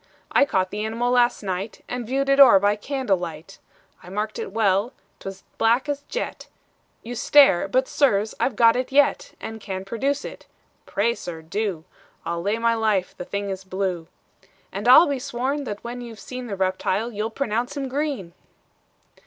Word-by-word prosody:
I - - +5
caught 185 -8 0
the 210 +1 -3
animal 230 +3 -1
last 245 -2 +3
night, 190 +2 -4
And 245 -2 -4
viewed 270 +2 0
it 275 0 +3
o'er 260 -7 +9
by 205 +2 +2
candlelight: 195 - -3 0.4
I 180 - -12
marked 210 +2 -3
it - - -5
well 210 +2 +1 0.3
't - - -10
was 195 0 -12 0.2
black 235 +5 +3
as 285 -1 -2
jet - - -4 0.6
You 240 - -6
stare 245 -7 +5
but 260 +6 +1
sirs, 220 -7 +2
I've 265 - 0
got 230 0 +5
it 255 +2 -2
yet, 290 - +2
And 220 0 -7
can 190 -2 -5
produce 270 +7 -1
it." - - -9 0.4
"Pray, 225 +4 +1
sir, 170 -7 -8
do: 190 -1 -3 0.4
I'll 170 0 -2
lay 205 +5 0
my 230 0 +2
life 215 -5 0
the 180 - -7
thing 200 +1 -3
is 190 0 -5
blue." 185 -3 -3 0.6
"And - - -4
I'll 260 +7 +9
be 280 -2 -1
sworn, 275 +2 -2
that 205 -4 -6
when 245 +1 -6
you've 230 -3 -9
seen 255 -1 -7
The 205 - -4
reptile, 190 +4 -1
you'll 215 0 -3
pronounce 235 +2 -2
him 275 -1 -2
green." 265 - -3
225 Hz, 180 wpm, -23 LUFS, 195-255 Hz, 0.6 s, o'er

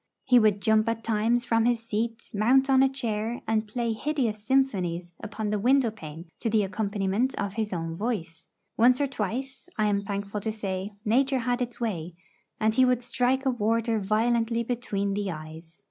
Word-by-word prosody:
He 250 -2 +6
would 210 -3 +2
jump 220 0 +3
at 230 0 -3
times 230 +2 +1
from 230 0 +2
his 240 -1 +2
seat, 230 +1 -2
mount 260 +6 +3
on 265 0 +6
a 270 - +5
chair, 230 -3 -3
and 220 -1 +1
play 235 +1 -1
hideous 230 -4 -2
symphonies 185 -9 0
upon 215 -1 -4
the 210 - 0
window 250 +1 +3
pane 160 -5 -9
to 230 - -1
the 215 -1 +3
accompaniment 205 +4 -1
of 200 -1 -3
his 220 -1 -2
own 165 -2 -3
voice; 170 -7 -3 0.3
once 245 +3 +5
or 285 - +2
twice, 265 - -4
I 215 - +2
am 205 -1 +1
thankful 200 +1 -4
to 220 - -2
say, 200 -1 -4
nature 265 +5 +2
had 245 +1 -1
its 245 -1 -3
way, 180 -8 -3 0.4
and 220 0 +2
he 260 +3 +4
would 250 -1 +2
strike 260 +2 0
a 265 - +3
warder 230 0 0
violently 230 +3 +1
between 215 -5 -2
the 200 -1 -2
eyes. 160 0 -9
220 Hz, 185 wpm, -27 LUFS, 200-245 Hz, 0.4 s, He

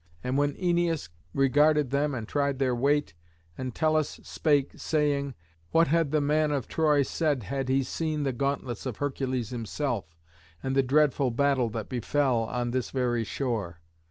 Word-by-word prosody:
And 125 +1 -1
when 145 0 +2
Æneas 175 - 0 0.2
regarded 145 - +3
them 140 0 +1
and 115 -3 -5
tried 140 0 0
their 130 -2 +1
weight, 140 - +1 0.4
Entellus 155 - 0
spake, 145 -3 +1
saying, 145 -3 0 0.3
"What 165 -1 +3
had 165 -1 +2
the 155 +1 +2
man 150 +1 +2
of 140 -5 -1
Troy 150 -3 +3
said 145 -3 0
had 135 +6 -3
he 135 +1 +3
seen 155 +3 -2
the 135 -2 0
gauntlets 135 -2 -2
of 125 - -4
Hercules 130 -4 -2
himself, 115 - -3 0.5
and 130 0 -1
the 135 - +5
dreadful 135 0 +3
battle 130 -1 +2
that 110 - -4
befell 125 -1 +1
on 120 +1 -2
this 130 -1 -1
very 120 -3 0
shore? 100 -3 -3
140 Hz, 155 wpm, -28 LUFS, 125-150 Hz, 0.5 s, the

